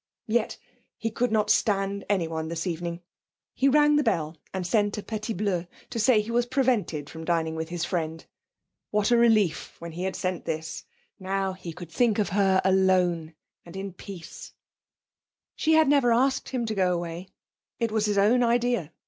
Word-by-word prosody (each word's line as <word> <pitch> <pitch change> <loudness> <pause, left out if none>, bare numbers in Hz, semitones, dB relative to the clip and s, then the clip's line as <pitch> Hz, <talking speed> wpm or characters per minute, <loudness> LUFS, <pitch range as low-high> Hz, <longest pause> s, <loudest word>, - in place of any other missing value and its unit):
Yes; 225 0 0 0.4
he 225 - -2
could 245 +2 0
not 215 -1 +2
stand 200 -2 +1
anyone 165 -5 -1
this 165 +1 -3
evening. 170 0 -4 0.5
He 270 - +2
rang 295 +1 +5
the 295 - +3
bell 165 - 0 0.2
and 190 -1 -3
sent 205 +2 +1
a 210 - -5
petit 220 0 -4
bleu 180 -3 -1 0.2
to 235 - -3
say 225 0 +5
he 215 +2 -6
was 240 +1 +1
prevented 240 - 0
from 160 +1 -9
dining 160 -1 0
with 160 0 -4
his 175 -1 -2
friend. 160 -2 -3 0.6
What 210 +2 +1
a - - +6
relief 215 -8 +2
when 170 0 -8
he 170 +3 -6
had 190 -1 -2
sent 185 -1 -3
this 160 0 -4 0.3
now 190 0 -1
he 185 -2 -8
could 165 0 -10
think 235 -1 +2
of 210 -4 +1
her 190 -1 +3
alone 180 -4 +2 0.3
in 190 +2 -7
peace.... 180 -2 -10 1.0
She 320 - +2
had 315 -1 +5
never 275 -4 +4
asked 265 +3 +2
him 250 -3 -2
to 220 - -2
go 185 -3 +2
away. 175 +2 -5 0.5
It 230 -2 -1
was 215 -1 +1
his 205 -1 0
own 220 +5 +4
idea. 240 -7 +1
195 Hz, 180 wpm, -26 LUFS, 170-230 Hz, 1.0 s, a